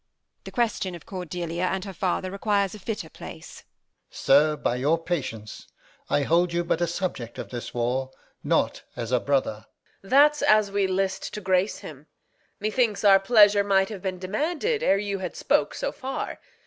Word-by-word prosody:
The - - -8
question 220 -6 -1
of 170 - -12
Cordelia 175 -1 -4
and 190 +1 -2
her 195 - -7
father 185 0 -1
Requires 200 -1 0
a 215 - -9
fitter 205 -3 -4
place. - - -10
Alb. - - -21 0.4
Sir, 150 +3 +3
by 125 - -1
your 145 +6 +2
patience, 130 - -5 0.4
I 145 - +2
hold 170 +4 +2
you 170 0 0
but 170 - -1
a 175 - +2
subject 165 -9 -4
of - - -6
this 120 -2 -6
war, 125 +2 -1 0.3
Not - - +1
as 120 -1 -5
a 125 - +3
brother. 125 -6 -1 0.3
Reg. 195 - -15
That's 295 +2 +5
as 215 -2 +4
we 200 -1 +1
list 190 0 -1
to - - -4
grace 185 +1 +1
him. 150 0 -11 0.5
Methinks 215 0 0
our 195 -1 +7
pleasure 205 -1 +5
might 195 0 +2
have 205 -4 -7
been 185 -1 -3
demanded 315 - -1
Ere 195 - +3
you 200 -1 -3
had 180 -2 -5
spoke - - +1
so - - -2
far. 265 +1 -5
185 Hz, 180 wpm, -25 LUFS, 160-205 Hz, 0.5 s, our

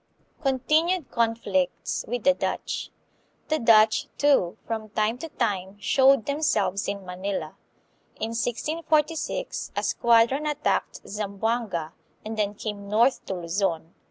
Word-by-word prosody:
Continued 305 +5 +1
Conflicts 225 -6 0
with 245 0 -3
the 275 - +5
Dutch. - - -3 0.6
The 310 0 +1
Dutch, 215 -2 +5
too, 275 -12 +3
from 220 -1 -4
time 215 +3 0
to 325 - -6
time 200 -7 -2
showed 265 +2 +4
themselves 220 - 0
in 200 -1 -4
Manila. 185 +2 -4 0.6
In 220 - -3
1646 310 - -1
a - - -1
squadron 235 +6 +3
attacked 300 0 -1
Zamboanga, 205 -4 -2 0.3
and 220 +1 -4
then 210 -1 -1
came 205 -1 -6
north 235 +5 +3
to 190 - -2
Luzon. 170 -1 -2
225 Hz, 120 wpm, -26 LUFS, 200-275 Hz, 0.6 s, the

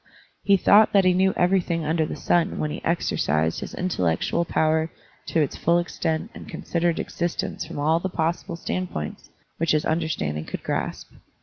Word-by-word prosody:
He 200 -1 +4
thought 210 +3 +5
that 195 -2 +5
he 185 - +5
knew 190 +1 +3
everything 175 -3 +1
under 160 0 +1
the - - -5
stm 175 -1 +1
when 150 - -1
he - - -6
exercised 80 - 0
his - - -7
intellectual 165 - 0
power 160 0 +1 0.4
to 165 - +1
its 145 - -1
full 170 +1 +2
extent 160 -2 -2
and - - -10
considered 170 -1 -1
existence 175 0 -3
from 165 -2 -8
all 155 +3 +2
the 190 - -3
possible 170 +1 -2
standpoints 170 - -4 0.3
which 165 -1 +1
his 155 - +1
understanding 80 - -1
could - - -6
grasp. - - -3
165 Hz, 170 wpm, -24 LUFS, 155-175 Hz, 0.4 s, thought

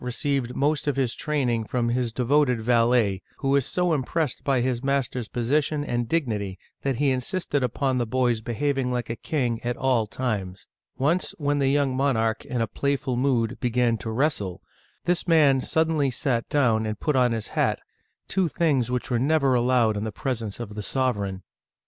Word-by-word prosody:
received 125 0 -1
most 150 +1 0
of 145 - +1
his 130 -4 0
training 130 -7 -1
from 120 +1 -1
his 120 -1 0
devoted 125 +1 +2
valet, 115 -4 +2 0.2
who 135 - -2
was 140 -2 +2
so 180 -2 +1
impressed 150 0 -1
by 135 -2 +2
his 125 0 -1
master's 135 -4 -1
position 145 +6 0
and 120 -4 -2
dignity 105 - -1 0.2
that 135 -2 0
he 140 +2 +2
insisted 145 +3 -1
upon 130 +1 0
the 120 - 0
boy's 120 -1 +1
be 120 +1 -4
having 135 -1 0
like 120 -2 -2
a - - -3
king 120 -4 -2
at 120 0 -2
all 125 -5 +1
times. 100 -6 -3 0.3
Once, 160 +7 0
when 145 -1 0
the 135 -1 +2
young 140 -2 +1
monarch, 115 -5 +1
in 120 -2 -1
playful 140 -2 -1
mood, 125 -2 0
began 120 -2 +1
to 115 - -6
wrestle, 110 - -1 0.5
this 175 +1 0
man 145 -5 +5
suddenly 160 -2 +1
sat 125 -2 -1
down 115 -6 +2
and 110 -1 -4
put 150 - 0
on 125 -2 +4
his 110 -2 -3
hat, - - 0 0.5
two 190 -2 +1
things 145 -7 +1
which 125 +1 -2
were 120 - +2
never 140 0 +2
allowed 120 -3 +3
in 105 - -2
the 110 - -3
presence 115 -4 -4
of 110 -3 -6
the 105 - -5
sovereign. 100 -6 -1
125 Hz, 180 wpm, -25 LUFS, 115-140 Hz, 0.5 s, man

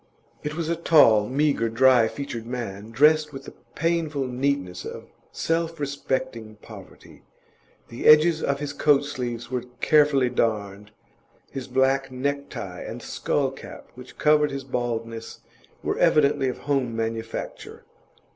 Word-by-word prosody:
It 150 0 -4
was 165 -1 -3
a 170 - 0
tall, 115 -11 +5
meagre, 140 -4 +1
dry 125 0 +5
featured 120 -3 -6
man, 110 -4 -5
dressed 150 +5 +4
with 135 -1 -9
the - - -11 0.2
painful 160 -4 0
neatness 125 -8 -2
of - - -9 0.2
self 165 0 -2
respecting 130 -6 -3
poverty: 105 - -14 0.7
the 115 - -3
edges 155 +2 +6
of 140 0 -1
his 145 -1 -4
coat 145 -1 +3
sleeves 120 -4 -5
were 125 -1 -2
carefully 145 -5 +3
darned; 105 -4 -2 0.6
his 135 -2 -6
black 135 +1 +1
necktie 140 +2 -4
and - - -7
a - - -11
skull 135 -2 -1
cap 135 - -12
which 125 +1 -13
covered 150 -1 +3
his 140 0 -5
baldness 115 -3 -4 0.4
were - - -2
evidently 140 -2 +3
of 125 - -5
home 135 -5 0
manufacture. 115 0 -5
135 Hz, 135 wpm, -24 LUFS, 115-145 Hz, 0.7 s, edges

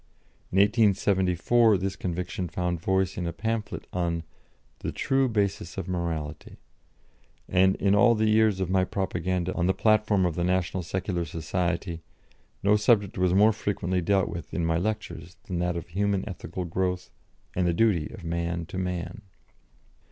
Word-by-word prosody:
In 95 - -1
1874 100 0 +3
this 95 +1 -3
conviction 90 0 -3
found 90 0 -2
voice 95 +1 0
in 90 - -2
a - - -1
pamphlet 105 +4 -3
on 85 -2 -1 0.6
the - - -3
"True 135 -1 +1
Basis 100 -5 -1
of 95 -2 -4
Morality," 80 -4 -4 0.9
and 95 +1 +3
in 100 0 +2
all 115 +3 +5
the 110 0 +1
years 110 -2 +3
of 95 - 0
my 95 +1 +2
propaganda 90 -1 -2
on 85 0 0
the 95 - +2
platform 105 -2 +3
of 85 - 0
the 85 +2 -2
National 90 0 0
Secular 90 0 -2
Society 85 +2 -2 0.6
no 105 +1 +5
subject 105 -2 +2
was 90 0 +3
more 105 +3 +6
frequently 95 -3 -1
dealt 95 +2 +2
with 85 -4 -7
in 85 - 0
my 80 0 +1
lectures 90 -4 -4
than 90 -3 -4
that 90 0 0
of 85 0 -7
human 100 +2 0
ethical 90 -2 -5
growth 90 +1 -2 0.4
and 90 -1 +1
the - - +3
duty 85 -4 +2
of 95 - -10
man 85 0 -2
to 90 +3 -5
man. 90 +1 -4
90 Hz, 160 wpm, -27 LUFS, 85-100 Hz, 0.9 s, more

